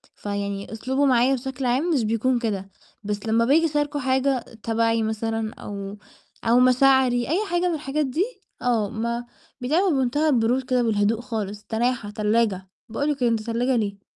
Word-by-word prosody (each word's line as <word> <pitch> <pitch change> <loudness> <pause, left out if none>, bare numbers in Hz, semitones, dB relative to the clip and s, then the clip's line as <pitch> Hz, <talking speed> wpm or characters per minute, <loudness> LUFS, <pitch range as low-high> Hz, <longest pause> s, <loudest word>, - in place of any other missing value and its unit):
فيعني 200 0 -4
أسلوبه 265 +5 0
معايا 255 0 +4
بشكل 265 +1 -5
عام 265 +8 +1
مش 255 -6 +2
بيكون 230 +3 +1
كده، 200 -4 -3 0.3
بس 205 0 -4
لمّا 230 +1 +2
باجي 315 +6 +4
أشاركة 295 -1 -1
حاجة 265 0 +1 0.2
تبعي 225 0 +1
مثلًا 220 0 -2
أو 200 0 -7 0.5
أو 235 +2 +4
مشاعري 255 -1 +4
أي 385 +7 +1
حاجة 350 +1 +1
من 340 - 0
الحاجات 295 0 -1
دي، 305 +8 0 0.4
آه، 230 -5 +1
ما 235 +2 -3 0.4
بيتعامِل 325 +7 +2
بمنتهى 270 +4 +1
البرود 250 0 +2
كده 255 -1 +1
والهدوء 220 +1 +1
خالص، 210 -4 -5
تناحة، 235 -1 -1
تلّاجة، 210 -3 0 0.2
باقُول 285 +6 -2
له 295 - +1
كده: 250 -3 +1
"أنت 225 -1 0
تلّاجة 235 +3 0
ليه؟" 200 -3 -2
240 Hz, 165 wpm, -24 LUFS, 220-265 Hz, 0.5 s, معايا